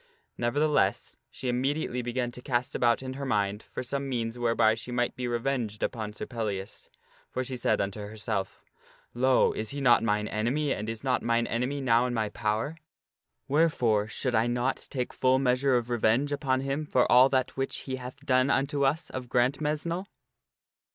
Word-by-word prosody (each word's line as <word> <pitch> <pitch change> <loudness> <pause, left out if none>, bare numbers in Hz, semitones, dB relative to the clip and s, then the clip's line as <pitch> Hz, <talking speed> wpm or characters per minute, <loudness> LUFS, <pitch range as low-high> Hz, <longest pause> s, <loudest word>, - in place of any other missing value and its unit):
Nevertheless, 145 +5 +1
she 130 - -7
immediately 125 +1 0
began 120 0 -2
to 125 - -10
cast 125 -1 -1
about 120 +1 +2
in 130 0 -4
her 140 +1 -6
mind 105 -5 -1
for - - -4
some 140 +2 -3
means 115 -2 -2
whereby 115 -2 +3
she 115 +2 -7
might 120 0 0
be 125 -1 -3
revenged 120 -3 -2
upon 110 -3 -2
Sir 105 - -6
Pellias; 105 -5 -5 0.4
for 130 - -2
she 130 0 -5
said 120 - +1
unto 100 +1 -2
herself, 105 -1 -4 0.2
" - - -30
Lo! 130 +2 +3
is 110 - -3
he 140 - -4
not 125 -4 +5
mine 105 -1 0
enemy 130 +8 0
and 105 +1 -4
is 115 +1 -5
not 130 -2 +1
mine 115 0 +1
enemy 125 +5 -2
now 120 -1 +3
in 120 - -3
my 110 -2 0
power? 110 +10 -2 0.7
Wherefore 125 -9 +2
should 125 +3 -3
I 115 +1 +3
not 120 +2 -1
take 125 -3 -3
full 130 0 +3
measure 130 0 +2
of 120 0 -3
revenge 120 +5 +2
upon 130 -2 0
him 140 +3 -2
for 125 - +3
all 125 +2 +7
that 130 -2 0
which 135 0 -2
he 130 -1 -4
hath 130 +3 -9
done 130 0 +3
unto 140 +1 +1
us 145 +5 0
.of 125 -2 -6
Grantmesnle 150 +8 0
125 Hz, 185 wpm, -28 LUFS, 115-135 Hz, 0.7 s, all